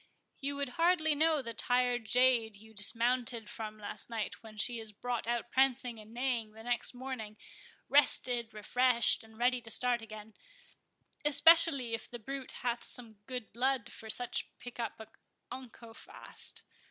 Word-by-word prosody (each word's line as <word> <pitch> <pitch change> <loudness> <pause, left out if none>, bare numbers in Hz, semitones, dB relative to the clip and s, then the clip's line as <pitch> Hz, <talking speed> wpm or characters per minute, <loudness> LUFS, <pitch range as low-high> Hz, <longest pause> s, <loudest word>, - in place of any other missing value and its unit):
"You 280 0 -2
would 280 -2 -2
hardly 330 -2 +3
know 310 -1 +2
the 230 -1 -5
tired 245 0 +1
jade 245 -2 +3
you 220 +2 -14
dismounted 230 +2 +1
from 215 -1 -6
last 210 +2 -2
night, 225 -3 -4
when 220 -1 -13
she 235 +3 0
is 220 -1 -7
brought 240 +2 -4
out 240 0 -2
prancing 255 -3 +1
and 215 +1 -13
neighing 235 -3 -2
the 220 0 -12
next 245 +1 -1
morning, 245 -5 -6 0.5
rested, 245 -5 +3
refreshed, 235 +3 +2
and 220 0 -17
ready 245 +1 +2
to 225 - -10
start 245 +1 +2
again—especially 285 - +1
if 225 - -4
the 240 - -7
brute 265 +3 -6
hath 240 -1 -1
some 225 -4 +2
good 250 -3 -6
blood, 250 0 0
for 220 - -9
such 245 +2 0
pick 245 0 -10
up 230 -2 -4 0.5
unco 235 -3 -10
fast." - - -7
240 Hz, 155 wpm, -32 LUFS, 225-260 Hz, 0.5 s, hardly